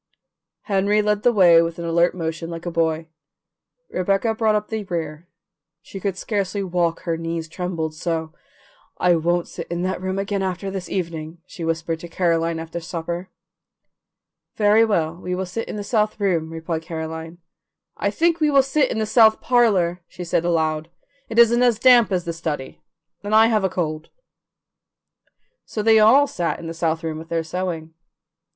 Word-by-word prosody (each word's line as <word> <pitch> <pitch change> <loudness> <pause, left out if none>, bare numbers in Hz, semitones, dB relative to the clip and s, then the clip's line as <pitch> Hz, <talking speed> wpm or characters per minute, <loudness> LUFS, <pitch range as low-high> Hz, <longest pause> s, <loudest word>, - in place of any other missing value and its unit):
Henry 205 +1 +1
led 210 0 +1
the 245 - +4
way 175 -6 +6
with 165 0 -2
an 170 - -5
alert 170 +2 +2
motion 165 -1 -4
like 165 0 -7
a 175 - -3
boy; 160 -1 0 0.8
Rebecca 195 +5 +1
brought 220 -1 +1
up 210 0 -2
the 220 -1 -3
rear; 165 -2 -5 0.6
she 195 - -9
could 195 -1 -2
scarcely 200 -1 -2
walk, 175 -2 -1
her 165 -2 -2
knees 165 0 -4
trembled 165 -2 -4
so. 160 0 -3 0.6
"I 180 - +3
can't 175 +1 0
sit - - -7
in 175 +1 -3
that 185 0 -2
room 190 +1 -2
again 200 0 -2
this 190 0 -4
evening," 165 -3 -4
she 170 - -9
whispered 165 0 -2
to 175 - -8
Caroline 165 -1 0
after 165 +1 -5
supper. 170 +1 -5 1.3
"Very 210 +1 +4
well, 170 -7 0
we 180 0 -4
will 190 +1 -2
sit 205 +6 -5
in - - -5
the 205 - -4
south 215 0 0
room," 170 -6 0
replied 165 0 -4
Caroline. 160 0 -6 0.6
"I 200 - -1
think 335 +9 +1
we 305 -1 +3
will 275 -2 +5
sit 270 +1 +1
in - - -3
the 220 - 0
south 220 0 +5
parlour," 195 -8 +2
she 180 - -8
said 170 -1 0
aloud; 160 -2 0 0.4
"it 225 - -5
isn't 235 +1 +6
as 240 -3 +4
damp 240 -2 +6
as 180 -2 0
the 170 - -3
study, 155 -5 -5 0.4
and 205 +1 0
I 220 +1 +7
have 215 -3 +1
a 190 - +2
cold." 155 -3 -3 1.6
So 215 - -4
they 220 0 +6
all 245 +7 +6
sat 175 -11 -2
in - - -9
the 165 - -5
south 165 0 -1
room 160 -1 -3
with 165 +1 -11
their 165 -1 -1
sewing. 165 -1 -4
175 Hz, 180 wpm, -22 LUFS, 165-210 Hz, 1.6 s, I